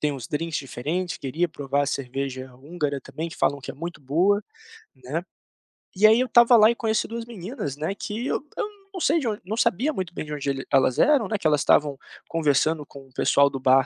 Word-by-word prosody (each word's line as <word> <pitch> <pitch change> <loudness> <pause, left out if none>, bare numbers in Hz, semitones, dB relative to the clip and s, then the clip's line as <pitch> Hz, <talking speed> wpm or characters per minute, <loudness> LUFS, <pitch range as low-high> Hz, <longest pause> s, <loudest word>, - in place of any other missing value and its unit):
tem 150 -1 +1
uns 125 -4 -7
drinks 160 +2 -2
diferentes, 155 +7 -3
queria 160 +6 -1
provar 140 -2 -1
a 140 - -1
cerveja 130 -1 -4
húngara 145 +1 -3
também, 160 +5 -6
que - - -11
falam 140 -1 +1
que - - -7
é - - -9
muito 170 +1 -7
boa, 175 +10 +2 0.5
né. - - -5 0.7
E 200 +3 +4
aí 220 +2 +7
eu 255 - +1
estava 240 0 +6
lá 215 0 +7
e 235 - +1
conheci 220 -2 0
2 230 0 -5
meninas, 205 - -6
né, 160 +6 -2
que 220 +5 -4
eu - - -1
eu - - -1 0.3
não 370 - -4
sei 325 +3 +3
de 270 - -3
onde 215 -2 -2
não 210 +5 -4
sabia 235 - +2
muito 185 - -4
bem - - -4
de 150 0 -7
onde 145 -1 -3
ele 135 -1 -3
elas 130 -2 +3
eram, 285 -7 +4
né, 215 +1 -1
que - - -14
elas 150 -2 +4
estavam 145 -1 +3 0.3
conversando 155 -1 +1
com 135 0 -13
o 130 - -24
pessoal 140 +2 +4
do 135 - -5
bar 130 +1 +4
155 Hz, 230 wpm, -24 LUFS, 140-215 Hz, 0.7 s, aí